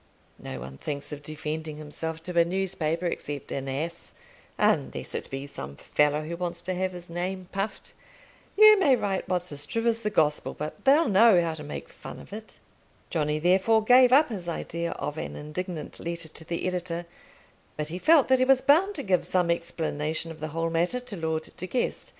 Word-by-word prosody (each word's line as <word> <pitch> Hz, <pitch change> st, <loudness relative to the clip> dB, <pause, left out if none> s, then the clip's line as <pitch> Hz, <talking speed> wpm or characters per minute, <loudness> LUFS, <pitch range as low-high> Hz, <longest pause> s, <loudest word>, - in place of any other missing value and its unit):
No 65 Hz, -, -6 dB
one 65 Hz, +2 st, -9 dB
thinks 145 Hz, 0 st, -4 dB
of 145 Hz, -, -7 dB
defending 155 Hz, +1 st, -5 dB
himself 160 Hz, +2 st, -5 dB
to 180 Hz, -1 st, -6 dB
a -, -, +7 dB
newspaper 175 Hz, -2 st, -1 dB
except 145 Hz, -4 st, -4 dB
an 135 Hz, 0 st, -3 dB
ass; 160 Hz, +6 st, -4 dB, 0.4 s
unless -, -, +1 dB
it -, -, -4 dB
be 135 Hz, +1 st, -5 dB
some 70 Hz, -, -8 dB
fellow 150 Hz, -, +1 dB
who 165 Hz, +2 st, -5 dB
wants 175 Hz, -1 st, -3 dB
to 185 Hz, +2 st, -2 dB
have 185 Hz, 0 st, -1 dB
his 175 Hz, -1 st, -7 dB
name 180 Hz, +2 st, -4 dB
puffed. 195 Hz, +2 st, -4 dB, 0.6 s
You 430 Hz, -1 st, +9 dB
may 285 Hz, -9 st, +5 dB
write 200 Hz, -5 st, -2 dB
what's 180 Hz, -1 st, -1 dB
as 145 Hz, 0 st, -4 dB
true 230 Hz, 0 st, -2 dB
as 230 Hz, -1 st, +2 dB
the 210 Hz, -2 st, -1 dB
gospel, 150 Hz, -6 st, +1 dB
but 150 Hz, -, -6 dB
they'll 285 Hz, +4 st, +5 dB
know 205 Hz, -1 st, +6 dB
how 165 Hz, -1 st, 0 dB
to 160 Hz, -, -8 dB
make 150 Hz, -, -6 dB
fun -, -, -10 dB
of -, -, -12 dB
it." 220 Hz, +1 st, -9 dB, 0.5 s
Johnny 150 Hz, -2 st, 0 dB
therefore 190 Hz, +7 st, +3 dB
gave 250 Hz, +2 st, +7 dB
up 285 Hz, +3 st, +6 dB
his 185 Hz, -6 st, -5 dB
idea 170 Hz, 0 st, -3 dB
of 150 Hz, +2 st, -4 dB
an -, -, -5 dB
indignant 160 Hz, +3 st, -6 dB
letter 170 Hz, -1 st, -2 dB
to 160 Hz, -, -4 dB
the 170 Hz, +1 st, -2 dB
editor, 175 Hz, -2 st, -2 dB, 0.7 s
but 150 Hz, 0 st, -2 dB
he 175 Hz, +3 st, -4 dB
felt 310 Hz, -, +5 dB
that 260 Hz, 0 st, +4 dB
he 255 Hz, -, +4 dB
was 265 Hz, 0 st, +5 dB
bound 370 Hz, +8 st, +4 dB
to 280 Hz, -, -3 dB
give 185 Hz, -3 st, +2 dB
some 180 Hz, -2 st, +1 dB
explanation 165 Hz, -1 st, -2 dB
of 160 Hz, -, -10 dB
the 155 Hz, -, -3 dB
whole 165 Hz, +2 st, -2 dB
matter 175 Hz, +9 st, +1 dB
to 250 Hz, -4 st, -6 dB
Lord 160 Hz, -2 st, -2 dB
De 185 Hz, -, -5 dB
Guest. 245 Hz, +5 st, -2 dB
170 Hz, 200 wpm, -27 LUFS, 155-195 Hz, 0.7 s, You